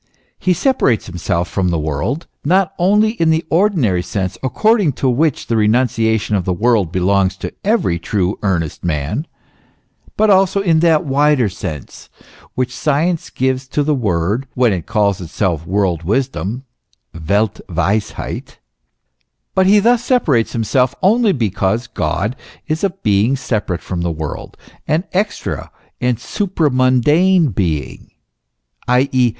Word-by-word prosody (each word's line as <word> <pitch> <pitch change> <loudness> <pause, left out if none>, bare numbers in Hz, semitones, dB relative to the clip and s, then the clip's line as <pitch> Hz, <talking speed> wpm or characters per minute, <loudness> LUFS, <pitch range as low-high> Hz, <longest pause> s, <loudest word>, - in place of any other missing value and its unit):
He 185 - +2
separates 175 - +1
himself 90 -1 -2
from 95 -1 -1
the 85 - 0
world, 80 - -2 0.2
not 190 +5 +2
only 210 +4 +3
in 165 - +3
the 160 +1 +1
ordinary 160 - +2
sense, 95 0 -3
according 190 - +2
to 135 - -1
which 140 +3 +1
the 115 - -1
renunciation 110 -1 +1
of 95 - 0
the 90 - -1
world 105 -3 +1
belongs 95 +1 +1
to - - -6
every 195 - +1
true, 95 +2 -1
earnest 85 -6 -2
man, 85 - -2 0.9
but 215 -1 +4
also 195 0 +3
in 170 -5 +2
that 160 -2 +3
wider 140 -4 +2
sense 90 - -8 0.5
which 125 -1 -2
science 155 +5 0
gives 130 0 -1
to 145 +2 -1
the 150 +1 +1
word, 105 - -1
when 125 -4 +3
it 90 -3 -5
calls 105 -4 +1
itself 85 -1 -2
world 95 -4 0
wisdom 120 +3 -2 0.7
(welt 105 +2 +1
weisheit); 95 +5 -2 1.0
but 190 0 +3
he 205 +2 +6
thus 235 +3 +3
separates 155 - +1
himself, 125 +3 +1
only 220 +3 +4
because 110 - -1
God 105 +3 -2 0.3
is 155 +3 -2
a 200 - +3
Being 115 - +1
separate 105 -9 -2
from 90 -2 -4
the 85 - -1
world, 80 -2 -6 0.3
an 160 +3 +1
extra 200 +3 -2 0.3
and 125 -1 +1
supramundane 155 - +2
Being, 80 -8 -3 0.8
i. 125 +2 +3
e. 125 -2 +3
125 Hz, 140 wpm, -17 LUFS, 95-160 Hz, 1.0 s, he